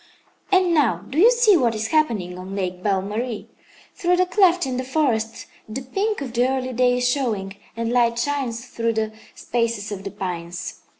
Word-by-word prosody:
"And 370 -2 +4
now, 230 - +2
do 285 - -2
you 440 +7 +8
see 480 -4 +5
what 240 -8 +2
is 220 0 -2
happening 225 - +1
on 185 +2 -7
Lake 185 -2 -3
Belle 195 -1 +1
Marie? 220 +2 -4 0.4
Through 360 -2 +1
the 365 - +4
cleft 360 -2 +3
in 255 -2 -2
the 255 - -2
forest 250 -5 -1 0.2
the 255 +5 -5
pink 395 +9 -1
of 255 -4 -5
the 245 +2 +2
early 260 -1 -2
day 250 +1 +3
is 245 0 +1
showing, 220 -8 -1 0.2
and 230 +1 -1
light 235 -1 +3
shines 245 -2 -2
through 230 -2 -1
the 220 0 -1 0.2
spaces 230 -3 -2
of 195 -1 -5
the 200 - -4
pines. 180 -2 -5
240 Hz, 190 wpm, -22 LUFS, 210-285 Hz, 0.4 s, you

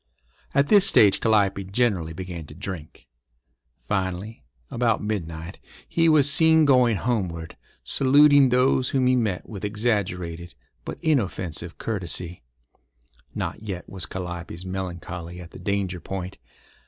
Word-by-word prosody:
At 140 - +4
this 200 +4 +5
stage 100 -3 +5
Calliope 100 -3 +2
generally 95 -6 0
began 85 -2 -7
to 75 - -12
drink. 90 -7 -8 0.8
Finally, 95 0 -3 0.3
about 115 -3 +1
midnight, 85 -6 -5 0.3
he 165 -1 +2
was 150 -3 +5
seen 160 +2 +5
going 125 -5 +4
homeward, 90 -10 -2 0.3
saluting 145 0 +5
those 125 +1 +2
whom 130 -2 +1
he 130 0 +4
met 110 -7 -1
with 100 -3 -8
exaggerated 90 -6 -2 0.3
but - - -6
inoffensive 95 - -1
courtesy. 90 -4 -3 0.9
Not - - -4
yet 95 -5 -6
was 90 -4 -4
Calliope's 85 -1 -6
melancholy 90 -2 -6
at 85 -1 -11
the - - -11
danger 100 -3 -2
point. 95 +1 -6
95 Hz, 125 wpm, -24 LUFS, 90-120 Hz, 0.9 s, this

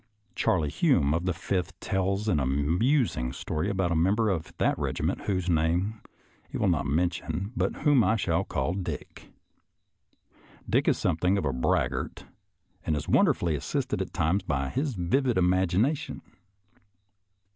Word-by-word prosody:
Charley 80 -6 +1
Hume, 75 - +2
of 85 +3 -1
the - - +2
Fifth, 90 +2 -3
tells 95 +2 -1
an 90 -8 +2
amusing 75 - +1
story 80 +6 -3
about 95 -3 0
a - - +1
member 100 +7 +2
of 80 -4 -3
that - - +2
regiment, - - -2
whose 95 -3 -1
name 90 +6 +1 0.5
he - - -4
will 105 - +1
not 75 -5 0
mention, 90 +5 -1
but - - -2
whom 145 -5 +5
I 110 - +3
shall 95 -4 0
call 70 -1 -2
Dick. 95 -1 -6 1.4
Dick - - +1
is - - +3
something 90 +3 +1
of 95 - -1
a 70 - 0
braggart 65 - -1 0.6
and 80 - 0
is 75 +1 -4
wonderfully 85 -2 +3
assisted 75 - -2
at - - -4
times 85 +6 +1
by 70 -1 -2
a 135 - +2
vivid 125 - 0
imagina 95 - +2
tion. 150 - -8
90 Hz, 150 wpm, -27 LUFS, 80-100 Hz, 1.4 s, whom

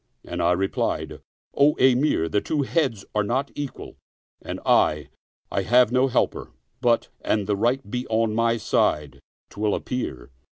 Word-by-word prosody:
and - - -4
I 85 +1 +3
replied, 95 +2 -2 0.3
"O 145 +2 +4
Emir, 130 - +3
the 100 +5 0
two 150 -3 -1
heads 130 -9 -1
are 105 - +2
not 130 +7 -1
equal, 145 -2 -7 0.4
and - - -6
I, 75 -2 +2 0.4
I 100 - 0
have 120 +3 +4
no 130 +1 +3
helper; 120 - -1 0.3
but, 120 -2 +2
an 105 -2 0
the 105 +1 0
right 120 +5 0
be 125 +4 -4
on 110 -1 +1
my 115 +1 +2
side 75 - 0 0.3
'twill 105 0 0
appear." 65 - -5
115 Hz, 155 wpm, -24 LUFS, 100-130 Hz, 0.4 s, O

